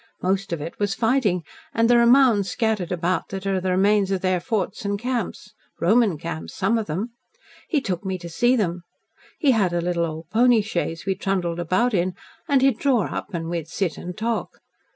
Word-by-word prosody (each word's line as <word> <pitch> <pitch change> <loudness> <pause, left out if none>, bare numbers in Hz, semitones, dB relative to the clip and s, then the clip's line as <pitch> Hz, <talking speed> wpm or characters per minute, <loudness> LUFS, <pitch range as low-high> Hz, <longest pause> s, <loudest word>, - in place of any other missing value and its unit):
Most 190 +1 0
of 170 - -2
it 165 +3 -7
was 205 -2 0
fighting, 225 -6 +1 0.3
and 230 0 +3
there 240 0 +5
are 235 - +5
mounds 240 -6 +5
scattered 220 -6 -1
about 180 +1 -1
that 195 0 -6
are 195 -1 0
the 185 - -1
remains 195 +2 +3
of 190 -2 -1
their 185 -1 +1
forts 210 0 -2
and 200 0 -1
camps. 240 -2 -4 0.3
Roman 210 -1 +3
camps, 80 - -6
some 220 +5 +1
of 220 - -4
them. 195 +10 -3 0.6
He 300 -5 +1
took 185 -7 -3
me 190 -1 -2
to 170 -1 -9
see 240 +10 +2
them. 180 -6 -1 0.6
He 290 -6 +3
had 200 -7 +2
a 175 - +1
little 170 0 0
old 160 0 -7
pony 235 0 +5
chaise 170 -5 -3
we 195 - +1
trundled 185 -3 -2
about 185 +8 +1
in, 180 -1 0 0.3
and 275 -4 +3
he'd 265 -4 +3
draw 260 -6 +1
up 190 - -5
and 165 -1 -3
we'd 165 -2 -3
sit 175 -2 -2
and 180 0 -7
talk. 230 +1 -2
195 Hz, 205 wpm, -23 LUFS, 175-230 Hz, 0.6 s, there